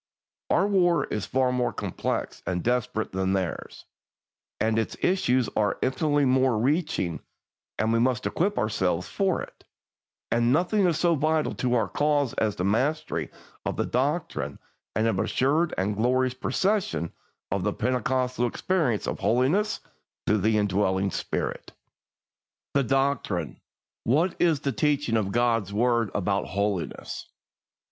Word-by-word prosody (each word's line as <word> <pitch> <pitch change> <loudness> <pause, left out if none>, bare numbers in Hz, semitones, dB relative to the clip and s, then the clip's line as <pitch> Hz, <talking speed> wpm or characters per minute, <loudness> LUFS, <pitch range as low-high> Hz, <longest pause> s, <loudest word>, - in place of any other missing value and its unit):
Our - - +3
war 175 -6 +3
is 105 - -3
far 130 -1 +2
more 125 -1 0
complex - - -3
and 90 -2 -1
desperate 125 -2 0
than 95 0 0
theirs, 95 -3 -3 0.7
and 110 0 +2
its 110 - -3
issues 130 - +2
are 105 -1 +1
infinitely 145 +2 +2
more 130 0 +3
far - - 0
reaching, 135 - 0 0.6
and 110 +1 +1
we 115 - +3
must 125 +1 +1
equip 200 +5 0
ourselves 95 -5 0
for 190 -3 0
it; - - -13 0.7
and 120 +1 +3
nothing 180 +6 +3
is 165 -3 +1
so 170 0 +3
vital 155 0 +1
to 125 -1 0
our 115 -3 +2
cause 145 -3 +1
as 105 -4 -1
a - - 0
mastery 135 +11 0 0.3
of - - -3
the - - +1
doctrine 145 +7 -1 0.4
and 110 - +2
an 115 - +1
assured 155 +6 +1
and 100 +2 0
joyous 125 +3 +2
possession 185 - -1 0.4
of 95 -1 0
the 105 - +1
Pentecostal 125 +1 0
experience 145 - 0
of - - -3
holiness 130 - +1 0.4
through 105 0 +2
the 110 +3 +2
indwelling 100 -1 +1
Spirit. - - -3 1.0
I. 140 - +3
The - - +2
Doctrine. 135 - 0 0.4
What 160 +9 +2
is 160 -5 +3
the 140 - 0
teaching 140 +1 +1
of 105 -3 0
God's 115 -3 +1
word 115 +1 +2
about 100 0 0
holiness? 100 -2 -3
125 Hz, 145 wpm, -26 LUFS, 105-150 Hz, 1.0 s, Our